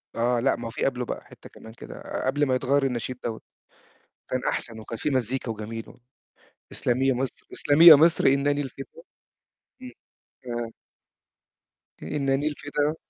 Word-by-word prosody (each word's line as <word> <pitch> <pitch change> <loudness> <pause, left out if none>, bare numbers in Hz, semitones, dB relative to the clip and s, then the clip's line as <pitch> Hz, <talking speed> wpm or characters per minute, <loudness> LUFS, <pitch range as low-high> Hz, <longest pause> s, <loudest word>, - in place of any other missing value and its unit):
آه، 120 +1 +1
لأ، 135 +3 +2
ما 115 -1 -6
في - - -3
قبله 125 -2 -1
بقى - - -5
حتّة - - -15
كمان 110 0 -13
كده - - -7
قبل 145 +3 +1
ما 130 -1 +1
يتغيّر 135 +2 +1
النشيد 125 -1 -2
دوّة، 110 -2 -4 0.9
كان 130 - -1
أحسن، 115 -2 -3
وكان 115 +1 -7
في 150 - -1
مزيكا 130 -1 -1
وجميل 110 +1 -7
و - - -17 0.7
اسلمي 125 +2 0
يا 135 - +3
مَصر، 130 0 -4
إسلمي 150 +4 +4
يا 160 - +14
مَصر 165 +3 +4
إنني 140 +1 +3
الفدا، 135 - -6 1.0
امم، 255 - -8 0.5
ف 120 -2 -5 1.3
إنني 140 0 0
الفدا. 145 +1 -1
130 Hz, 150 wpm, -25 LUFS, 120-145 Hz, 1.3 s, يا